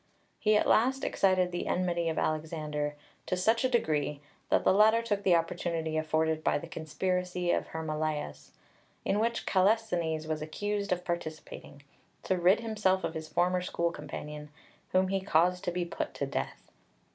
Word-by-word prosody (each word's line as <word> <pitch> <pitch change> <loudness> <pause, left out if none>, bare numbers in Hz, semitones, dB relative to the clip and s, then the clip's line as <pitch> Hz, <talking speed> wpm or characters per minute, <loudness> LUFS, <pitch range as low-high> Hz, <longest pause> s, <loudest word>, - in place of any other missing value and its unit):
He 215 0 +4
at - - +2
last 265 +4 +3
excited 185 -2 +2
the 175 - -3
enmity 175 -2 0
of 160 - -3
Alexander 155 -2 -2 0.3
to 185 - 0
such 225 +6 +2
a 255 - +3
degree 150 - 0 0.3
that - - +3
the - - +5
latter 220 +3 +5
took 205 -3 -1
the 185 -3 +4
opportunity 165 -1 -1
afforded 155 0 0
by - - +2
the 145 - -6
conspiracy 180 +2 -2
of - - 0
Hermolaus, 155 - -3 0.6
in 205 - +1
which 230 +1 0
Kallisthenes 185 -6 +1
was 155 -1 -2
accused 200 +6 -3
of 180 0 -1
participating, 155 -4 -6 0.4
to 190 - +1
rid 185 +5 +4
himself 210 -5 +1
of 160 - -2
his 160 -1 -5
former 180 +3 +1
school 170 -1 -1
companion, 150 -1 -7 0.4
whom 185 0 +3
he 195 0 0
caused 180 0 +2
to 175 - 0
be 175 0 -1
put 170 - -4
to - - -1
death. - - -5
175 Hz, 165 wpm, -30 LUFS, 155-190 Hz, 0.6 s, the